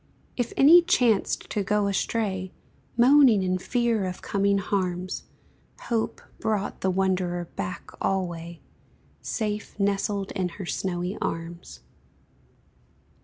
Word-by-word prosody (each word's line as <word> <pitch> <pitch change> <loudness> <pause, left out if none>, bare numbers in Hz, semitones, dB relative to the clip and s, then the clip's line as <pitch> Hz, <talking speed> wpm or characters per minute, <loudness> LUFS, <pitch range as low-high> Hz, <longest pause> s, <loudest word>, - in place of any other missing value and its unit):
If 245 -2 -2
any 320 +6 +8
chanced 240 - +2
to 210 - 0
go 210 +1 +1
astray, 195 -2 -1 0.5
Moaning 250 -4 +6
in 185 0 0
fear 235 -1 0
of 180 -1 -5
coming 200 0 +1
harms, 185 -2 -2 0.6
Hope 230 -2 -2 0.2
brought 210 -2 -2
the 190 - +1
wanderer 185 -2 0
back 185 +2 -5
alway, 170 -3 -2 0.6
Safe 210 -1 -3
nestled 200 0 0
in 185 -3 -1
her 195 - -5
snowy 180 +2 -3
arms. 165 +1 -5
195 Hz, 110 wpm, -26 LUFS, 185-215 Hz, 0.6 s, any